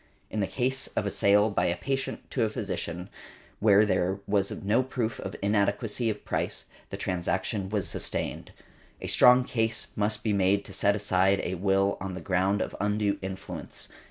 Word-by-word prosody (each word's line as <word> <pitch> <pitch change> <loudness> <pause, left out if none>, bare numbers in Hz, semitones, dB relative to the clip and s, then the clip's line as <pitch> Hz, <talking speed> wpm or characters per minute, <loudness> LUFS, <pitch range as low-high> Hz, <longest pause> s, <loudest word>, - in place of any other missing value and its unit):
In 110 - -2
the 100 - +1
case 130 +1 0
of - - 0
a - - -1
sale 105 +2 +4
by 90 -3 +1
a 85 - 0
patient 135 0 -3
to 130 - -1
a 110 - +1
physician, 95 -5 -4 0.5
where 105 0 +6
there 95 -1 0
was 100 -1 +1
no 105 +5 +1
proof 125 -3 -3
of 95 - -5
inadequacy 105 +3 +1
of 105 - -4
price, - - -2 0.2
the - - -5
transaction 95 +2 -2
was 105 -2 -1
sustained. - - -3 0.5
A - - -7
strong 125 +1 +6
case 115 -2 -1
must 105 +1 -1
be 110 - +1
made 100 +1 +2
to - - -9
set 100 0 +2
aside 95 -1 +2
a 90 - -2
will 95 +2 +1
on 95 -1 -4
the - - -5
ground 95 +3 +1
of - - -7
undue 105 0 0
influence. 95 0 -6
100 Hz, 180 wpm, -28 LUFS, 95-110 Hz, 0.5 s, where